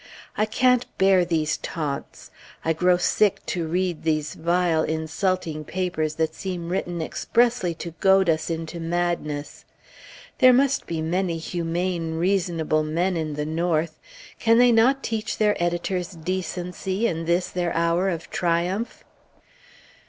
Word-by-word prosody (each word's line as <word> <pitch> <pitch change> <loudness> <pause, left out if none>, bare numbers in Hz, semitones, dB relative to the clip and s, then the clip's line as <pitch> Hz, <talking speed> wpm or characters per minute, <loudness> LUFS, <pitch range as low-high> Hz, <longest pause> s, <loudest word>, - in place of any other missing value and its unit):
I 215 - +1
can't 250 +2 +2
bear 190 -1 +5
these 160 -3 0
taunts! 145 -4 -5 0.3
I 165 - +2
grow 180 +2 +3
sick 195 +3 +1
to 170 -3 -2
read 180 0 -1
these 155 -2 -1
vile, 170 -1 +1
insulting 160 +1 -1
papers 160 -3 -2
that 160 0 0
seem 180 -3 -5
written 175 -2 -2
expressly 230 -2 +1
to 170 +1 -6
goad 190 -1 +4
us 160 0 +1
into 165 +1 -4
madness!... 165 -3 -2 0.8
There 255 -2 +7
must 275 +2 +2
be 160 -2 -2
many 175 +1 0
humane, 170 0 -2
reasonable 170 -3 +1
men 170 +4 0
in 155 -2 -2
the 150 0 -2
North; 160 0 -1 0.4
can 230 0 +4
they 245 0 +6
not 250 +4 +4
teach 225 -1 -2
their 210 -1 +3
editors 175 +1 -1
decency 185 +3 -3
in 165 -6 -1
this 175 +2 +1
their 175 -1 -1
hour 170 +3 +2
of 170 -2 -4
triumph? 180 +6 -1
175 Hz, 135 wpm, -24 LUFS, 160-190 Hz, 0.8 s, There